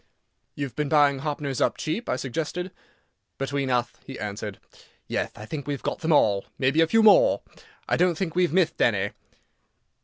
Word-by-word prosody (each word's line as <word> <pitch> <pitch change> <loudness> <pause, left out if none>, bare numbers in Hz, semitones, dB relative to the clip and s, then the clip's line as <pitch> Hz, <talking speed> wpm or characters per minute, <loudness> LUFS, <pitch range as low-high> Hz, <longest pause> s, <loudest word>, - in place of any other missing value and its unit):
"You've 140 -4 -5
been 150 -1 -1
buying 145 -2 +4
Hoppners 145 -2 -3
up - - +2
cheap," 205 +10 -3
I - - +1
suggested. 160 +8 -4 0.7
"Between 135 0 -2
uth," 120 -1 -1
he 135 - -9
answered, 105 -1 -5 0.5
"yeth, - - -3
I 105 - -8
think 145 +4 -6
we've 140 -3 -3
got - - -2
them 165 -1 -1
all. 100 -9 +3
Maybe 140 +4 +2
a 165 - +4
few 225 +5 +4
more. - - +6 0.4
I - - +1
don't 180 -1 +3
think 165 -1 -3
we've 180 -2 +2
mithed 170 -2 +1
any." 100 -3 +2
145 Hz, 175 wpm, -25 LUFS, 125-165 Hz, 0.7 s, more